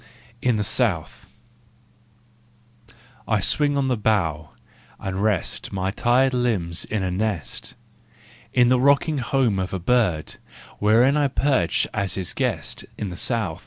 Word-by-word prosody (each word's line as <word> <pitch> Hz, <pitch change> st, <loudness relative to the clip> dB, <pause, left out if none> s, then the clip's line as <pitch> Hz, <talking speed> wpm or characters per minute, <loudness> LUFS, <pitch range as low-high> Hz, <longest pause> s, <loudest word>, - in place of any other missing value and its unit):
IN 125 Hz, -2 st, +2 dB
THE 105 Hz, -, 0 dB
SOUTH* 105 Hz, -7 st, -1 dB, 2.0 s
I 105 Hz, -2 st, +2 dB
swing 145 Hz, -, +2 dB
on 135 Hz, -2 st, +1 dB
a -, -, +2 dB
bough, 85 Hz, -9 st, 0 dB, 0.5 s
and 95 Hz, 0 st, -4 dB
rest 105 Hz, -4 st, -1 dB
My 95 Hz, 0 st, -2 dB
tired 125 Hz, +5 st, +2 dB
limbs 105 Hz, -10 st, -1 dB
in 105 Hz, -3 st, -2 dB
a 90 Hz, -, -1 dB
nest, 100 Hz, -3 st, -3 dB, 0.4 s
* 110 Hz, -, -29 dB, 0.3 s
In 125 Hz, -1 st, +4 dB
the 125 Hz, 0 st, +4 dB
rocking 140 Hz, +2 st, +3 dB
home 125 Hz, -5 st, +1 dB
of 95 Hz, +1 st, -3 dB
a -, -, -3 dB
bird, 90 Hz, -6 st, 0 dB, 0.4 s
Wherein 120 Hz, +7 st, +4 dB
I 145 Hz, -1 st, +3 dB
perch 130 Hz, -, +1 dB
as 100 Hz, -2 st, -1 dB
his 95 Hz, -3 st, -2 dB
guest, -, -, -2 dB
In 105 Hz, -, -3 dB
the 90 Hz, -, -7 dB
South! 100 Hz, -5 st, -2 dB
110 Hz, 145 wpm, -23 LUFS, 95-125 Hz, 2.0 s, In